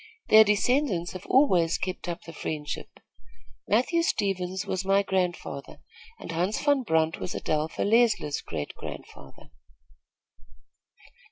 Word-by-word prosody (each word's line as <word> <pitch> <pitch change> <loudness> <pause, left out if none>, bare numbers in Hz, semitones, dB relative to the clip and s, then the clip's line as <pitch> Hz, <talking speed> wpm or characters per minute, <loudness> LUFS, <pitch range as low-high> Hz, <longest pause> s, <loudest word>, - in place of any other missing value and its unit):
Their 220 0 +9
descendants 210 - +1
have 185 - -9
always 180 - +3
kept 185 -1 -4
up 170 - -5
the 165 - -10
friendship. 150 -1 -5 0.8
Matthew 255 - +2
Stevens 190 - -1
was 190 -1 -2
my 195 +1 +3
grandfather, 180 -7 -3 0.4
and - - -7
Hans 180 +6 -1
Van 285 -2 +2
Brunt 160 -7 +1
was 180 - -5
Adelpha 155 +1 -1
Leisler's 220 -10 +2
great 75 -3 -5
grandfather. 70 -1 -11
185 Hz, 115 wpm, -27 LUFS, 165-215 Hz, 0.8 s, Their